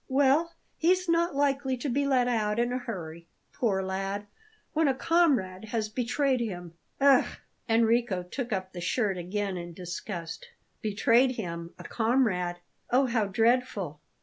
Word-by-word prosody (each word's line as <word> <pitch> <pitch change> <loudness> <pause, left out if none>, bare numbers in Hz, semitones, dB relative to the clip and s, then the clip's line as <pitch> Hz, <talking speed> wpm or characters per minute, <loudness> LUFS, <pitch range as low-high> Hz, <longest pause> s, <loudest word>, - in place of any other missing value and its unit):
"Well, 285 +5 +3 0.2
he's 365 +2 +2
not 335 -1 +2
likely 275 -2 +1
to 265 - -4
be 280 +2 +1
let 255 -3 +3
out 215 -3 0
in 240 +1 +1
a 255 - -1
hurry, 170 -8 -7 0.3
poor 195 -6 0
lad, 195 +2 -3 0.5
when 320 -1 +3
a 270 - +2
comrade 260 - +2
has 220 -1 -2
betrayed 255 +4 0
him. 175 -7 -4 0.3
Ugh!" 275 -2 +5 0.4
Enrico 225 -4 +2
took 240 +7 -5
up 190 -2 -3
the 175 - -6
shirt 195 +1 0
again 195 +2 -2
in 175 0 -7
disgust. 175 -1 -6 0.3
"Betrayed 230 +5 +3
him? 170 -5 -5
A - - -10
comrade? 220 -7 +1 0.3
Oh, 260 +3 +4
how 230 -4 +1
dreadful!" 215 - +1
225 Hz, 150 wpm, -28 LUFS, 190-260 Hz, 0.5 s, Ugh